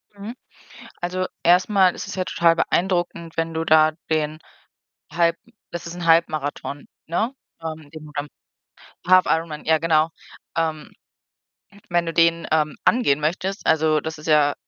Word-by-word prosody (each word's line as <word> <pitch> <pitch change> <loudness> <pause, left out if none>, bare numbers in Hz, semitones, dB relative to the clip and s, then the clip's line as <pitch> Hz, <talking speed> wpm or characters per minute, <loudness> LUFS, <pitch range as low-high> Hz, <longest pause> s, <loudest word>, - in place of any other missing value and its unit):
Mhm. 210 +4 -8 0.7
Also, 185 +1 -2 0.2
erst 180 +4 +4
mal 190 -3 +4
ist - - -6
es - - -6
ja 185 - -1
total 170 -1 +3
beeindruckend, 175 -2 -1
wenn 165 0 -1
du 160 - -1
da 155 0 +5 0.2
den 155 0 -1 0.7
Halb 170 0 +2 0.3
das 175 - -6
ist 170 - -7
'n 175 - -5
Halbmarathon, 155 -3 +1 0.2
ne, 220 +10 -1 0.3
ähm, 160 -2 -7
den 155 -1 -10
du 150 - -12
dann 145 +1 -3 0.8
Half-Ironman, 165 -4 +3
ja 160 0 +4
genau. 160 -1 +2 0.5
Ähm, 160 -2 -2 1.0
wenn 175 -1 +1
du 165 - -3
den, 165 0 +3
ähm, 155 -1 +1
angehen 195 - +3
möchtest, 185 +6 -2
also, 155 -1 +3
das 160 0 -6
ist 155 - -11
ja 150 -2 +4
165 Hz, 150 wpm, -22 LUFS, 155-175 Hz, 1.0 s, da